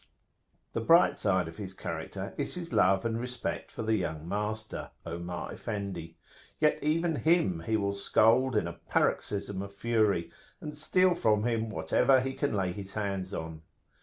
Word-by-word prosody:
The 115 Hz, -, -1 dB
bright 170 Hz, +9 st, +5 dB
side 95 Hz, -4 st, +2 dB
of 80 Hz, -, -9 dB
his 95 Hz, -3 st, -7 dB
character -, -, -5 dB
is -, -, -3 dB
his 170 Hz, -2 st, -6 dB
love 95 Hz, +3 st, +4 dB
and 115 Hz, 0 st, 0 dB
respect 125 Hz, +1 st, -4 dB
for -, -, -6 dB
the 110 Hz, 0 st, +2 dB
young 80 Hz, -4 st, -3 dB
master, 105 Hz, +3 st, -3 dB, 0.2 s
Omar 85 Hz, +1 st, -5 dB
Effendi; 95 Hz, -6 st, -5 dB, 0.4 s
yet 150 Hz, -1 st, +3 dB
even 160 Hz, +1 st, +1 dB
him 160 Hz, -, +2 dB
he 110 Hz, -, +2 dB
will 100 Hz, -1 st, 0 dB
scold 115 Hz, +5 st, +3 dB
in 105 Hz, -, +2 dB
a 85 Hz, -, -5 dB
paroxysm 100 Hz, +2 st, -1 dB
of 100 Hz, 0 st, -6 dB
fury, 105 Hz, -5 st, +1 dB, 0.3 s
and 150 Hz, 0 st, -7 dB
steal 185 Hz, +4 st, +3 dB
from 105 Hz, -10 st, +2 dB
him 115 Hz, -1 st, 0 dB
whatever 130 Hz, +4 st, +3 dB
he 135 Hz, +1 st, -2 dB
can 135 Hz, -3 st, -1 dB
lay 95 Hz, -2 st, 0 dB
his 95 Hz, +1 st, -8 dB
hands 100 Hz, -3 st, -2 dB
on. 80 Hz, -3 st, -5 dB
105 Hz, 165 wpm, -30 LUFS, 95-125 Hz, 0.4 s, bright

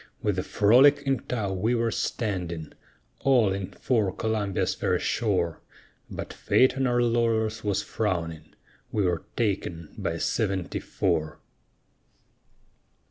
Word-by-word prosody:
With 105 Hz, -3 st, +1 dB
the -, -, +1 dB
Frolic 130 Hz, +10 st, +5 dB
in 135 Hz, -1 st, +1 dB
tow, 105 Hz, -6 st, -3 dB
we 110 Hz, +6 st, +1 dB
were 115 Hz, -1 st, +1 dB
standing, 90 Hz, -10 st, -3 dB, 0.5 s
All 120 Hz, -8 st, +3 dB
in 95 Hz, -1 st, -3 dB
for 110 Hz, -7 st, 0 dB
Columbia's 105 Hz, -2 st, -1 dB
fair -, -, 0 dB
shore; 90 Hz, -7 st, 0 dB, 0.5 s
But -, -, -6 dB
fate 130 Hz, 0 st, +3 dB
on 135 Hz, -1 st, +1 dB
our 120 Hz, 0 st, +2 dB
laurels 115 Hz, -2 st, +1 dB
was 100 Hz, -1 st, 0 dB
frowning, 80 Hz, -8 st, -3 dB, 0.4 s
We 105 Hz, -, +1 dB
were 90 Hz, 0 st, -1 dB
taken 95 Hz, -7 st, -2 dB
by -, -, -1 dB
a -, -, -5 dB
seventy 95 Hz, -3 st, -1 dB
four. 80 Hz, 0 st, -1 dB
105 Hz, 130 wpm, -26 LUFS, 90-115 Hz, 0.5 s, Frolic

